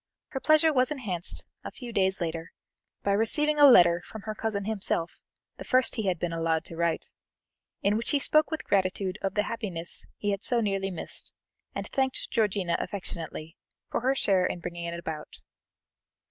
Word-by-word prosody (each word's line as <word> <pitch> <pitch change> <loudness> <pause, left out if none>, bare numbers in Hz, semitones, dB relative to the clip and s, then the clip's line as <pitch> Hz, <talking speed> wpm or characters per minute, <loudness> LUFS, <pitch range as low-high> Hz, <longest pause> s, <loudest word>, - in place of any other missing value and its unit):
Her 265 - -4
pleasure 310 +2 +4
was 255 -1 +3
enhanced, 210 - -2 0.2
a - - -5
few 245 -3 -9
days 190 -1 +2
later, 165 -1 -4 0.5
by 200 - +1
receiving 295 +9 +2
a 290 - +10
letter 175 -7 +7
from 220 +1 -10
her 215 - -3
cousin 215 -2 -2
himself, 200 -5 -1 0.5
the - - -7
first 255 0 +3
he 220 -4 -2
had 180 -2 +1
been 165 +1 -2
allowed 165 -1 0
to 165 - -8
write, 170 0 -1 0.7
in 205 +1 +3
which 230 - -2
he 290 - +3
spoke 305 +2 +3
with 315 - -3
gratitude 190 0 0
of 195 - -2
the 210 - +3
happiness 195 -8 -3
he 205 - -1
had 200 +1 -3
so 245 - +1
nearly 195 -3 0
missed, 175 -4 -3 0.4
and - - -3
thanked 265 -1 -1
Georgiana 200 -5 +1
affectionately 165 -4 -6 0.3
for - - 0
her 260 +2 +2
share 195 -7 +3
in - - -4
bringing 170 0 -5
it 170 0 -4
about. 160 -3 -6
200 Hz, 180 wpm, -28 LUFS, 170-235 Hz, 0.7 s, a